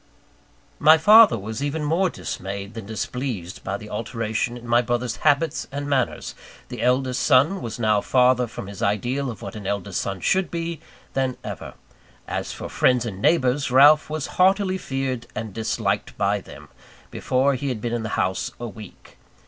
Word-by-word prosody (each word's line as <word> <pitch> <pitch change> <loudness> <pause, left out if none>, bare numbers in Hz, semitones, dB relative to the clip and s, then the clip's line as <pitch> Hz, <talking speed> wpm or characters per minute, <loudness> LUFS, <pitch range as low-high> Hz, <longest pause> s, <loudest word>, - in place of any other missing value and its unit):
My 155 +1 +7
father 215 - +7
was 110 +4 -6
even 150 +2 -2
more 170 +5 +1
dismayed 100 - -6
than 115 -3 -8
displeased 110 -4 -4
by 95 +1 -3
the 105 0 -11
alteration 115 +2 -2
in 120 0 -11
my 120 +1 +4
brother's 120 -1 -2
habits 155 +2 +1
and 145 +1 -4
manners 140 -2 -1 0.4
the - - -6
eldest 125 0 +1
son 155 +8 +3
was 115 -2 -5
now 110 -3 +2
farther 125 0 +3
from 110 - -8
his 100 +2 -9
ideal 120 +6 0
of 115 - -8
what - - -7
an 105 -3 -7
eldest 100 -1 -2
son 95 -1 -4
should 185 - +1
be, 170 -2 -4 0.3
than 130 -2 -1
ever. - - -7 0.5
As - - -3
for - - -7
friends 125 -1 +2
and 100 -4 -6
neighbours, 140 -2 +2
Ralph 145 +5 +6
was 155 -2 -3 0.2
heartily 190 0 +3
feared 135 -5 -3
and 110 -2 -5
disliked 110 -2 -2
by 100 0 +1
them, - - -13 0.4
before 135 +2 +1
he 135 +2 -3
had 125 -4 -3
been 120 +2 -3
in 120 - -1
the 110 - -4
house 95 +1 0
a 120 - -4
week. 105 -3 -13
125 Hz, 175 wpm, -23 LUFS, 110-140 Hz, 0.5 s, My